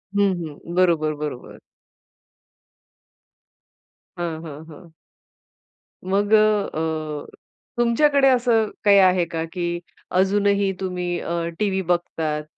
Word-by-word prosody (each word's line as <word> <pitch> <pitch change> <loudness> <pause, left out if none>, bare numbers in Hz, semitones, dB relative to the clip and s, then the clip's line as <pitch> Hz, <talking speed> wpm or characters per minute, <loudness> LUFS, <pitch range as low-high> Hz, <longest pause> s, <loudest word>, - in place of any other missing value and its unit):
हं, 200 -1 +3
हं. 160 +3 -9
बरोबर, 165 -4 +2
बरोबर. 145 -5 -7 2.6
हं, 165 -2 -3
हं, 150 0 -9
हं. 165 +3 -14 1.1
मग 200 +3 0
अ, 215 -1 +4
अ, 155 -2 -3 0.5
तुमच्याकडे 270 +4 +3
असं 235 -4 +2
काही 200 -1 +6
आहे 185 -2 +4
का, 165 -1 -4
की 175 -1 -2 0.4
अजूनही 200 0 +2
तुम्ही 180 -2 -3
अ, 170 0 -3 0.2
टीव्ही 195 -2 0
बघतात? 165 -3 -1
180 Hz, 100 wpm, -22 LUFS, 160-205 Hz, 2.6 s, काही